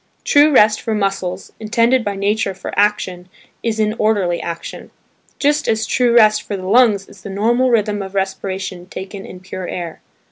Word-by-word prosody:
True 290 +1 +5
rest 215 -5 +5
for 225 - -2
muscles, 195 -2 -2
intended 230 +3 +2
by 205 -1 -2
nature 200 0 0
for 190 - -7
action, 185 -3 0 0.3
is 225 -1 -2
in 215 0 +1
orderly 200 -5 +1
action; 170 0 -7 0.5
just 295 +1 +1
as 220 0 +1
true 240 0 +2
rest 215 -2 +5
for 200 - -5
the 185 - -7
lungs 205 -2 +3
is 190 - -16
the 200 - -8
normal 235 +6 +1
rhythm 210 -3 +1
of 190 0 -7
respiration 190 -1 -3
taken 195 +1 -8
in 180 - -11
pure 185 -1 -7
air. 170 -2 -6
205 Hz, 175 wpm, -18 LUFS, 190-220 Hz, 0.5 s, True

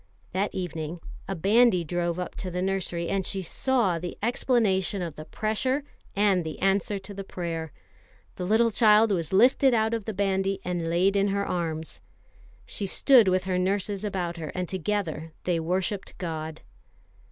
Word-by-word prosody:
That 195 +2 0
evening 165 -2 -4 0.3
a 195 - -2
bandy 200 +1 +4
drove 175 +1 -1
up 180 - -4
to 185 - -4
the 180 +1 -2
nursery, 185 -3 -1
and 195 +1 0
she 190 +1 -3
saw 210 -2 +1
the 175 +1 -6
explanation 215 -5 +1
of 165 -4 -5
the 155 - -8
pressure 255 - -1 0.3
and 200 -3 +3
the 160 -1 -5
answer 195 +1 +1
to 195 +1 -9
the 195 0 -6
prayer. 165 -4 -4 0.7
A - - -2
little 220 +5 +3
child 215 0 +5
was 165 -5 -1
lifted 250 +5 +5
out 220 0 +1
of 225 -3 -2
the 220 - -3
bandy, 195 0 0
and 175 -2 -2
laid 185 +4 +2
in 200 0 +3
her 200 0 0
arms. 160 -3 -3 0.6
She 200 - -4
stood 245 +1 +5
with 185 0 +2
her 185 -1 0
nurses 195 +2 -1
about 180 -4 -2
her, 160 -2 -5
and 180 -1 -2
together 170 -4 -3
they 175 -2 0
worshipped 185 +4 -2
God. 160 -3 -5
190 Hz, 170 wpm, -27 LUFS, 175-205 Hz, 0.7 s, child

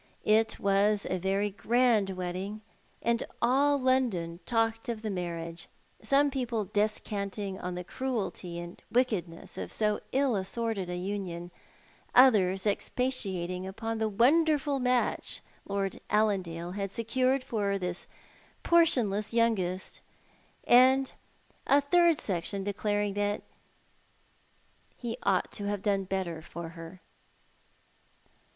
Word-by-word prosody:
It 220 +1 +3
was 200 +1 +2
a 185 - -1
very 195 +3 0
grand 230 -1 +2
wedding, 185 +3 -4 0.4
and 235 0 +1 0.2
all 280 +4 +3
London 235 -11 +1
talked 225 -1 0
of 225 -2 -4
the 215 - -2
marriage; 170 -2 -4 0.3
some 280 +1 +3
people 240 -5 -1
descantiug 200 -1 -2
on 180 0 -3
the 180 - -4
cruelty 200 -6 -3
and 175 +1 -9
wickedness 205 -10 -1
of - - -5
so 210 -1 0
ill 270 -3 +2
assorted 195 0 -2
a 180 - -3
union; 180 -2 -4 0.6
others 200 -7 +5
expatiating 190 -6 -1
upon 225 +3 -4
the 220 -1 +1
wonderful 285 +5 +3
match 250 -1 0 0.3
Lord 195 -1 -2
Allandale 185 -5 0
had 195 +1 -3
secured 255 +5 0
for 210 -5 -1
his 180 -2 -3 0.6
portionless 235 -12 +3
youngest; 195 -6 0 0.6
and 260 +2 +5 0.5
a 280 - +6
third 335 +3 +4
section 195 +1 -3
declaring 205 0 -1
that 205 0 -1 1.5
he 235 -2 -4
ought 195 -2 +1
to 205 - -4
have 205 -1 -2
done 195 -2 +1
better 185 -4 -3
for 170 0 -7
her. 165 +2 -11
205 Hz, 115 wpm, -29 LUFS, 185-240 Hz, 1.5 s, a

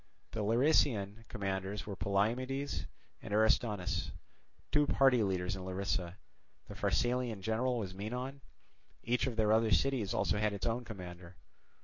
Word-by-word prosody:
The 115 - -4
Larisaean 115 -3 +2
commanders 95 0 -3
were 100 - -5
Polymedes 125 +9 -1 0.3
and 110 - -8
Aristonus, 105 -4 +2 0.6
two 150 -1 +4
party 135 -4 +4
leaders 95 -2 0
in 95 - -7
Larisa; 95 -1 -2 0.5
the - - -8
Pharsalian 120 -4 0
general 120 +4 +1
was 95 -5 -4
Menon; 125 +8 -5 0.6
each 120 +1 +1
of 125 - -2
the 110 -1 +2
other 110 0 +4
cities 110 +3 +2
had - - -1
also 105 - +1
its 105 -2 0
own 120 +1 -1
commander. 90 -4 -9
110 Hz, 135 wpm, -34 LUFS, 95-125 Hz, 0.6 s, two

